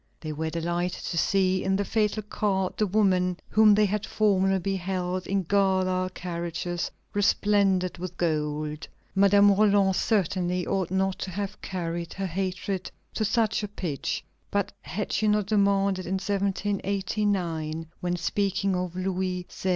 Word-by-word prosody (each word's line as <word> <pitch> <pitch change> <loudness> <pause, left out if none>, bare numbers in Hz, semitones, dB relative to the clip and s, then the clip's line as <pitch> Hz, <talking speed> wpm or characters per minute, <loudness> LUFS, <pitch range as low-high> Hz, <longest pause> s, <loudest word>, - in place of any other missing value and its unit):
They 155 -1 -5
were 160 +2 -2
delighted 175 +2 -2
to 170 - -3
see 190 0 +2
in 190 0 +1
the 200 +1 0
fatal 215 0 0
cart 195 -2 -1
the 215 - +2
woman 185 -3 +2
whom 215 -1 +6
they 210 0 +4
had 205 +1 -1
formerly 195 -2 +2
beheld 185 -1 -2
in 195 0 0
gala 185 -1 +2
carriages 175 0 -3 0.2
resplendent 200 -3 +2
with 180 -1 -6
gold. 150 -2 -1 0.3
Madame 200 +1 +6
Roland 200 -1 +4
certainly 180 -4 0
ought 190 -3 -1
not 190 0 0
to - - -4
have 200 +2 -5
carried 170 -2 -4
her 195 - -2
hatred 185 +1 -3 0.2
to 220 - -1
such 220 +1 +1
a 210 - -3
pitch; 175 -8 -3 0.3
but 200 -1 -1
had 205 +4 -4
she 215 +2 +1
not 210 -1 +2
demanded 200 -2 +2
in 190 - 0
1789, 195 -4 -1
when 180 0 -1
speaking 195 +2 0
of 180 -1 -3
Louis 185 -1 -2
XVI. 190 - -3
190 Hz, 145 wpm, -27 LUFS, 180-200 Hz, 0.3 s, whom